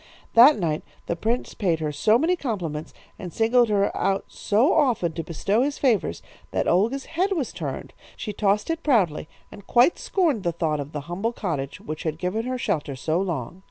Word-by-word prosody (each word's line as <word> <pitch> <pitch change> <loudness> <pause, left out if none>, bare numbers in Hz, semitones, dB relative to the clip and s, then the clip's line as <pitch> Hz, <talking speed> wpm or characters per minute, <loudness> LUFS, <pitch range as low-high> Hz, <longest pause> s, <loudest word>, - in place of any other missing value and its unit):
"That 255 +6 +8
night 160 -5 -1 0.2
the 170 - -2
prince 230 +8 -2
paid 175 -6 0
her 155 -1 -2
so 215 +10 +3
many 330 +7 +2
compliments 175 - -4 0.3
and 180 - -6
singled 230 +3 +3
her 200 -1 +1
out 195 0 0
so 230 - +2
often 235 - +2
to 165 - -4
bestow 195 +7 0
his 285 +2 0
favours, 220 - +1 0.3
that - - -1
Olga's 230 +10 +2
head 370 +4 0
was 305 -9 -2
turned. - - -6 0.2
She 210 - -5
tossed 210 +6 +1
it 330 0 -3
proudly, 190 - +1 0.2
and 200 - -13
quite 245 +8 +4
scorned 325 - +1
the 170 -2 -1
thought 155 -3 -1
of 145 +1 -5
the 150 - -4
humble 180 +10 -3
cottage 150 - -4
which 155 0 -6
had 155 -2 -3
given 190 +7 -2
her 255 0 -2
shelter 160 - -2
so 155 +6 -1
long. 175 -3 -4
200 Hz, 195 wpm, -24 LUFS, 165-245 Hz, 0.3 s, That